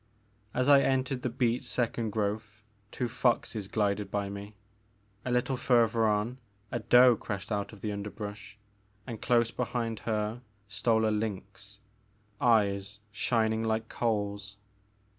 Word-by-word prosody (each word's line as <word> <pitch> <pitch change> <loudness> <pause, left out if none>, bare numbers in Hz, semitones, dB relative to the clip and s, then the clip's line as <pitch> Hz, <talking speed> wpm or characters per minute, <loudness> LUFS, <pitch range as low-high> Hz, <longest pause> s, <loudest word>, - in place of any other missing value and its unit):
As 125 +3 0
I 140 -1 +8
entered 130 -1 0
the 125 - -1
beech 120 0 0
second 120 -3 -1
growth 105 0 -3 0.3
two 125 - -2
foxes 115 -3 0
glided 105 -1 0
by 100 -1 -2
me; 100 +1 -8 0.7
a - - -3
little 125 +2 +1
further 115 -3 +3
on 105 +4 0 0.3
a - - -1
doe 125 0 +6
crashed 100 0 -6
out 100 -1 -1
of 105 - -13
the 105 - -2
underbrush, 105 +1 -7 0.5
and 115 -4 -7
close 115 -2 +3
behind 115 -2 -2
her 110 +2 -1 0.3
stole 110 +2 +1
a 110 - +1
lynx, 105 -1 -5 0.6
eyes 105 -3 +2
shining 110 -1 +1
like 110 0 -1
coals. 100 -3 -2
110 Hz, 135 wpm, -30 LUFS, 105-120 Hz, 0.7 s, I